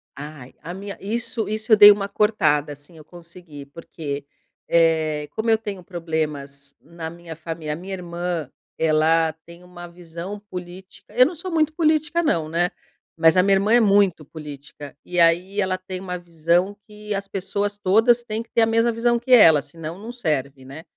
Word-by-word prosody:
Ai, 145 -3 -10
a 170 +3 -7
minha 200 +1 -7
isso 225 +1 -3
isso 215 +1 -4
eu - - +10
dei 205 0 +10
uma 200 -1 0
cortada, 175 -9 +1
assim, 145 +4 -16
eu 155 - -13
consegui 170 -3 -13
porque, 145 -1 -7 0.4
eh, 160 -3 +2
como 220 +1 -2
eu 225 - +5
tenho 205 -4 -7
problemas 150 -5 -5
na 165 -1 -8
minha 170 -1 -10
fami 160 -1 -7
a 150 - -1
minha 185 +4 -8
irmã, 175 -4 -4 0.3
ela 160 +1 +2
tem 170 +1 -14
uma 175 -1 -11
visão 170 +3 -8
política 185 +1 -11
eu 250 +1 +7
não 330 - -2
sou 370 +3 -6
muito 315 -2 +1
política 315 0 +1
não, 165 - 0
né. 170 +2 0 0.5
Mas 160 +2 +4
a 180 - +6
minha 195 0 +4
irmã 205 +4 +2
é 240 - +7
muito 200 -6 +3
política 145 -1 -11
e 180 0 -2
aí 175 +4 +3
ela 185 -1 -1
tem 185 0 -7
uma 180 -1 -5
visão 175 +3 0
que 210 -1 -7
as 200 0 -4
pessoas 200 +2 -3
todas 225 +5 +3
têm 220 -1 -4
que - - -31
ter 230 - +2
a - - +5
mesma 230 +1 +2
visão 235 +1 +1
que 255 +2 -7
ela. 165 - +7
Senão, 160 +4 -9
não 225 +3 -8
serve, 140 - -3
né. 140 +5 -10
175 Hz, 185 wpm, -22 LUFS, 160-210 Hz, 0.5 s, eu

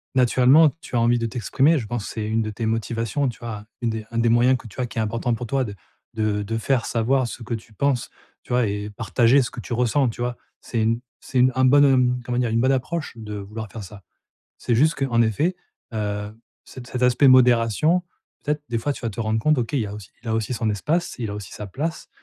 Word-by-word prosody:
naturellement 130 +5 +5
tu - - -7
as 120 - +3
envie 120 +1 +3
de 115 - -1
t'exprimer, 130 - +2
je 120 - -3
pense 120 -3 -3
que - - -7
c'est 110 -2 -3
une 110 +1 +1
de 110 - -2
tes 110 +2 -4
motivations, 115 +4 -1
tu 120 - -8
vois, 110 -3 -6 0.2
une 120 - 0
des 110 -1 -5
un 115 - -4
des 115 0 +3
moyens 120 +3 +4
que - - -16
tu 105 - -12
as 125 - -1
qui 115 - -12
est - - +2
important 115 +2 -1
pour 120 - -5
toi 135 +3 0
de 105 -5 -6 0.4
de 110 -2 0
de 115 +2 -3
faire 120 +1 0
savoir 125 +3 +1
ce 120 - -8
que 120 +1 -4
tu 115 0 -7
penses, 135 +2 0 0.3
tu 125 - -5
vois, 125 -1 +3
et 105 +1 -3
partager 115 +5 +3
ce - - -5
que 125 - -8
tu 120 - -5
ressens, 125 +2 +2
tu 115 - -7
vois? 120 0 -1 0.3
C'est 115 -2 -2
une 115 +2 +1 0.2
c'est 130 - -5
une 130 +1 +5
un 130 - +3
bon 130 -2 +5
comment 120 0 -2
dire? 120 -2 +1
Une 115 +1 +1
bonne 130 - +3
approche 145 +5 -2
de 105 -2 -7
vouloir 105 +2 -7
faire 110 - -7
ça. 100 +1 -11 0.6
C'est 120 - 0
juste, 155 +6 +4
qu'en 115 -2 +3
effet, 150 - +1 0.4
heu, 105 -1 -3 0.3
c 130 - -10
cet 125 0 -5
aspect 125 +2 +5
modération, 125 - +4 0.4
peut-être 150 0 -1
des 120 - -1
fois, 145 +5 -1
tu - - -9
vas 115 - -1
te 105 - -6
rendre 110 0 0
compte: 155 +6 +3
«OK 120 +3 -2
il 140 - +1
y 105 - -1
a 100 - -7
aussi 105 -4 -10
il 120 - -8
a 110 - +1
aussi 115 +2 -1
son 115 -2 -1
espace, 155 - -1
il 110 -4 -3
a - - -4
aussi 105 -4 -8
sa 105 - -7
place», 155 - -4
120 Hz, 255 wpm, -23 LUFS, 110-130 Hz, 0.6 s, naturellement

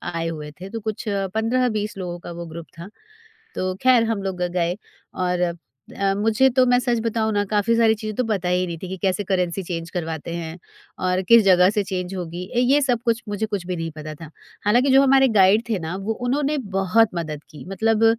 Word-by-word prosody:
आए 165 0 -1
हुए 150 -2 -6
थे 190 - -7
तो 225 +2 -5
कुछ 215 -1 -4
15-20 215 +2 -1
लोगों 175 -2 -5
का 175 - -9
वो 170 0 -7
ग्रुप 165 +1 -9
था। 180 +4 -8 0.7
तो 185 0 -1
खैर 250 -3 +5
हम 225 -3 -1
लोग 190 -2 -3
ग 180 - +1
गए 175 +1 0 0.4
और 180 -1 0 0.4
अ, 195 0 +1
मुझे 225 +5 +3
तो 255 0 +3
मैं 245 0 +4
सच 240 -2 0
बताऊँ 220 -1 0
ना 205 0 +2
काफ़ी 210 +3 +1
सारी 225 -1 +4
चीज़ें 215 -1 -6
तो 250 - 0
पता 195 -5 -1
ही 180 0 +1
नहीं 170 -1 -5
थी 185 - -4
कि 190 - -5
कैसे 190 +1 0
करेंसी 185 -1 -1
चेंज 170 -1 -5
करवाते 165 -1 -4
हैं 165 0 -5 0.5
और 185 +1 +1
किस 230 -1 +8
जगह 185 -1 +5
से 210 0 0
चेंज 185 -1 -4
होगी, 175 0 -5
ए, - - +3
ये 270 +4 +4
सब 245 -4 +1
कुछ 230 0 +1
मुझे 205 +1 -1
कुछ 205 -4 -4
भी 180 - -2
नहीं 165 -1 -3
पता 155 0 -8
था। 160 0 -11 0.4
हालाँकि 245 +6 +3
जो 270 +1 +7
हमारे 270 0 +5
गाइड 195 +4 +5
थे 210 -5 0
ना 165 +3 -4
वो 200 +3 -2
उन्होंने 290 +3 0 0.2
बहुत 210 +4 +3
मदद 155 -3 -4
की। 150 - -11
मतलब 220 +3 +2
195 Hz, 220 wpm, -22 LUFS, 175-225 Hz, 0.7 s, किस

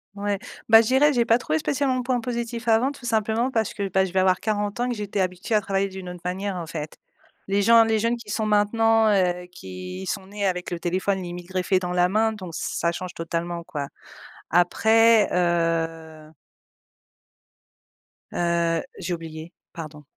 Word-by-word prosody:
Ouais. 200 -1 -2 0.3
Bah 225 0 +9
je 220 - -2
dirais: 285 +3 +4
«J'ai 240 -2 +2
pas 230 +1 +4
trouvé 160 -10 -1
spécialement 270 - 0
de 250 - -2
points 250 -1 0
positifs 235 0 -4
avant 230 +5 +3
tout 275 -3 -12
simplement 225 +2 0
parce 220 -4 0
que 200 -2 -2
bah, 190 +1 +2
je 185 - -6
vais 190 - +1
avoir 185 -1 +3
40 210 +1 -2
ans 250 +1 0
que 240 - -2
j'étais 205 -1 -4
habituée 185 +4 -2
à 210 - +4
travailler 195 0 0
d'une 190 -1 -8
autre 180 -1 -9
manière» 190 +2 -2
en 175 -2 -4
fait. 155 -1 -6 0.5
Les 200 +1 +1
gens, 230 +2 +7
les 225 -1 +1
jeunes 230 +2 +1
qui 220 -3 -12
sont 220 0 -1
maintenant, 220 +1 +3
heu, 180 -3 +1
qui 90 - -8
sont 190 - -4
nés 205 0 -3
avec 180 -1 -2
le 170 - -3
téléphone 185 +2 -1
limite 175 0 -7
greffé 185 0 +1
dans 180 -1 -4
la 180 0 +3
main 220 +2 +2
donc 185 -5 -8
ça 170 +1 -1
change 180 +1 -6
totalement 170 +1 -4
quoi. 145 -4 -5 0.6
Après, 220 +5 +4
heu 165 -3 -1 2.0
heu, 170 -1 +1 0.2
j'ai 180 -1 -3
oublié, 165 0 -8 0.2
pardon. 155 -3 -8
190 Hz, 185 wpm, -24 LUFS, 175-225 Hz, 2.0 s, Bah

